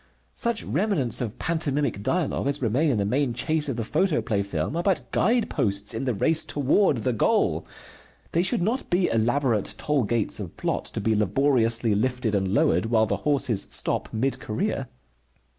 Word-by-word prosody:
Such 235 -2 0
remnants 165 - 0
of 115 -4 -4
pantomimic 145 -8 -1
dialogue 160 - -1
as 140 +1 0
remain 130 +6 +1
in 125 - +1
the 100 - 0
main 125 +3 0
chase 155 +1 0
of 135 - -2
the 115 - -2
photoplay 120 - 0
film 100 - -3
are 170 - 0
but 190 0 0
guide 235 +1 +2
posts 100 +1 -1
in 115 +4 -3
the 125 - 0
race 160 +10 +2
toward 145 +3 +2
the 125 - +1
goal. 110 - +1 0.6
They 170 - +2
should 180 -1 +1
not 235 +7 -1
be 180 +1 +2
elaborate 115 -1 +1
toll 150 -2 0
gates 115 0 0
of 95 -5 -7
plot, - - -2
to - - -2
be 110 +2 +1
laboriously 115 +1 +2
lifted 125 +1 0
and 95 -2 +1
lowered 115 +2 +2
while 110 -1 +3
the - - -1
horses 130 -8 0
stop, - - -1
mid 125 +3 -1
career. 135 - -2
130 Hz, 175 wpm, -25 LUFS, 110-155 Hz, 0.6 s, while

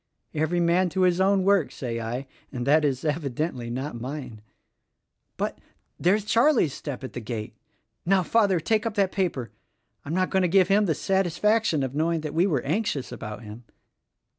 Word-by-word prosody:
Every 160 +3 0
man 175 +2 +3
to 185 +3 -1
his 180 0 +3
own 195 0 +3
work, 195 -9 +3
say 120 -3 -4
I; 120 +4 -4 0.3
and 125 -2 -4
that 150 +3 +4
is, 135 -1 0
evidently, 145 -4 -2
not 125 0 -4
mine. 125 -4 -6 1.0
But - - -3 0.2
— - - -47
there's 200 +4 +2
Charlie's 230 - +3
step 140 -3 -6
at 130 - -7
the - - -4
gate! 110 -2 -5 0.5
Now, 190 +1 +3
Father, 200 -3 +3
take 215 +7 +1
up 220 - -4
that 195 -2 +2
paper! 170 - -2 0.5
I'm 155 +4 -4
not 185 0 +1
going 190 - +2
to 180 - +3
give 185 +1 +4
him 205 +1 +4
the 160 - +1
satisfaction 195 -1 +1
of 130 -1 -3
knowing 160 +2 0
that 150 -1 -5
we 170 +4 +3
were 145 -9 +1
anxious 155 - -1
about 105 +2 -7
him." 110 +3 -10
160 Hz, 185 wpm, -25 LUFS, 130-190 Hz, 1.0 s, that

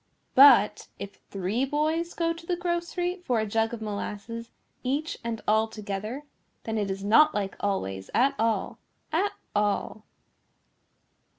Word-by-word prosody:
But 255 -6 +7
if 200 0 -8
three 195 +6 -1
boys 310 +5 0
go 335 -1 +1
to 335 0 -12
the 355 - +1
grocery 350 +1 -2
for 245 -8 +1
a 220 - 0
jug 225 +2 0
of 230 -2 -6
molasses 215 +2 -5 0.3
each 285 +5 -2
and 230 -1 -4
all 220 +1 +3
together 215 +4 -5 0.4
then 225 -1 -2
it 205 -1 -1
is 195 0 -4
not 300 +10 +5
like 200 -2 -2
always 95 - -2
at 270 +3 +3
all, 225 0 0 0.3
at 400 +6 +1 0.2
all. 210 +1 -1
225 Hz, 140 wpm, -27 LUFS, 205-305 Hz, 0.4 s, But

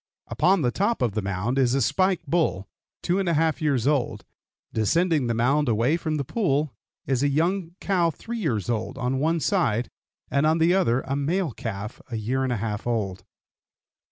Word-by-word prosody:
Upon 185 -3 +2
the 120 - +2
top 205 - 0
of 120 - +1
the 110 - -2
mound 100 +7 -1
is 130 -1 +3
a - - +2
"spike" 185 - +1
bull, 135 - 0 0.4
two 180 +2 +1
and 190 -3 0
a 165 - +2
half 160 +1 +1
years 140 -6 +1
old; 130 -7 0 0.5
descending 155 - +2
the 115 - 0
mound 135 +4 +2
away 115 +7 +2
from 160 -2 -2
the 145 - -1
pool 150 - 0 0.3
is 135 -2 0
a 145 - +3
young 170 +4 0
cow 180 -4 +2
three 230 +8 -6
years 115 - -1
old, 115 0 -2
on 130 0 -1
one 165 +3 +1
side, 135 - 0 0.4
and 140 +2 +3
on 160 +1 +3
the 165 +2 +4
other 130 -10 +2
a 135 +1 -3
male 160 +4 0
calf 105 0 -6
a 120 - -4
year 120 +5 -1
and 130 - -1
a 120 - 0
half 105 +1 -3
old. 100 -6 -2
140 Hz, 195 wpm, -25 LUFS, 115-165 Hz, 0.5 s, the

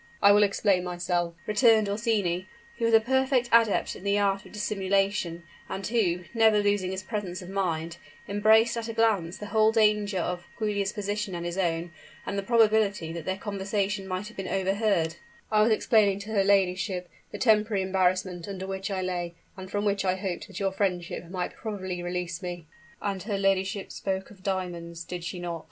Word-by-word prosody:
"I 200 - +7
will 205 +1 +6
explain 200 -2 +2
myself," 175 -1 -1
returned 220 -1 +4
Orsini, 200 -4 0 0.3
who 230 - +1
was 230 - +2
a - - +8
perfect 260 +1 +1
adept 230 -3 +3
in - - -11
the 200 0 +2
art 200 -1 +1
of - - -16
dissimulation, 195 -4 0 0.3
and 195 0 -4
who, 195 -7 +1
never 220 -2 +5
losing 205 -2 +1
his 190 0 -4
presence 190 -4 -4
of 180 - -10
mind, 170 -3 -2 0.3
embraced 220 +3 +4
at 230 -1 -3
a - - -3
glance 210 -7 +1
the 210 - -7
whole 220 0 +5
danger 210 -3 +2
of 175 0 -3
Giulia's 205 -2 -1
position 205 -1 -3
and 170 0 -4
his 175 0 -3
own, 170 -2 -1 0.3
and - - -3
the 200 - 0
probability 215 -6 +2
that 170 -2 -6
their 190 0 -1
conversation 200 -1 -2
might 185 +2 -3
have 230 - -13
been 195 -1 -4
overheard; 195 -3 +1 0.3
"I 215 -1 +4
was 220 +2 +4
explaining 215 -2 +3
to 210 +2 -7
her 200 -3 +3
ladyship 185 -2 +1 0.2
the - - -5
temporary 215 -4 +3
embarrassment 185 -1 0
under 190 -1 -5
which 190 +1 -4
I 190 -2 -2
lay, 175 -2 -3 0.2
and 190 0 -9
from 205 +1 -1
which 200 -1 +1
I 185 -1 +1
hoped 190 -1 -4
that 195 -3 -8
your 195 -1 0
friendship 180 -3 -2
might 180 -1 -3
probably 190 -5 -5
release 175 0 -3
me 175 -2 -6 0.2
" 155 - -26
"And 195 -2 -2
her 200 +1 -2
ladyship 195 0 0
spoke 190 0 -3
of 205 - -14
her 185 - -23
diamonds 175 -3 -3
did 175 0 -6
she 170 +2 -4
not?" 170 -1 -4
195 Hz, 195 wpm, -27 LUFS, 180-210 Hz, 0.3 s, a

